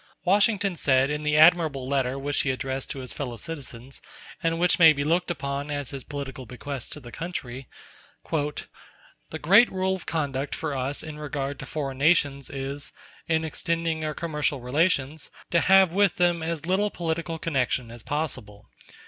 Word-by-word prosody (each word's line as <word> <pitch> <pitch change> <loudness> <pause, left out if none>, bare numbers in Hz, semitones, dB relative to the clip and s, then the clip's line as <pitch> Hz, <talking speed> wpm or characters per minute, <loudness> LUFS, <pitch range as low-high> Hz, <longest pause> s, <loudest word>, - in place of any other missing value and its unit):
Washington 200 0 +3
said 135 -2 +3
in 150 0 -2
the 150 0 +1
admirable 155 -5 +5
letter 135 -1 0
which 140 +1 0
he 140 - -1
addressed 130 0 -3
to 135 - -5
his 125 - -7
fellow 125 -5 -5
citizens, 135 -2 -7 0.4
and 165 0 0
which 180 +1 +3
may 165 -2 +9
be 140 -1 -2
looked 170 +5 +1
upon 140 -3 -3
as 145 -3 -3
his 135 -2 -6
political 135 -3 -6
bequest 130 +1 -6
to - - -5
the 120 -4 -11
country: 135 -5 -6 0.6
"The 150 +1 -6
great 200 +10 +6
rule 190 0 0
of 185 - -10
conduct 140 -3 -2
for - - -3
us 135 +2 -2
in 155 -1 -8
regard 140 -1 -4
to - - -7
foreign 135 -4 -4
nations 140 -3 +2
is, 140 +1 -5 0.4
in 160 -1 +1
extending 165 0 -1
our 155 -1 -2
commercial 150 -4 -1
relations, 140 +2 0 0.2
to 170 - +4
have 190 -1 +5
with 200 -2 +3
them 175 -1 +2
as 160 -1 -3
little 195 +4 +2
political 165 -2 -3
connection 130 -6 -1
as 120 0 -10
possible. 120 -8 -4
150 Hz, 170 wpm, -26 LUFS, 135-165 Hz, 0.6 s, may